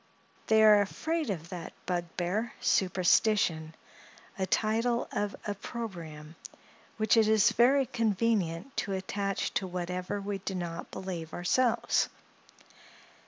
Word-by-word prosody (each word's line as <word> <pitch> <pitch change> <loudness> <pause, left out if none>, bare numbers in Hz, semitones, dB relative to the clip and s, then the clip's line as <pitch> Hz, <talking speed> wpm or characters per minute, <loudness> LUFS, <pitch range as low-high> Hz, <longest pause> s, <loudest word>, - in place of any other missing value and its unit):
They 220 0 +5
are 210 -1 +7
afraid 315 +9 -2
of 170 -4 -4
that 175 -3 -7
bugbear, 180 +5 -2
Superstition—a 185 -1 0
title 230 +4 +1
of 205 0 -2
opprobrium 175 -8 -6 0.6
which 215 0 +3
it 225 -2 +5
is 215 -2 +5
very 265 +3 +4
convenient 220 -3 0
to 200 - -1
attach 195 +1 -2
to 190 - -1
whatever 180 +2 -3
we 200 0 -4
do 195 0 -4
not 170 -2 -5
believe 175 -4 -6
ourselves. 230 +7 +2
195 Hz, 110 wpm, -30 LUFS, 175-220 Hz, 0.6 s, are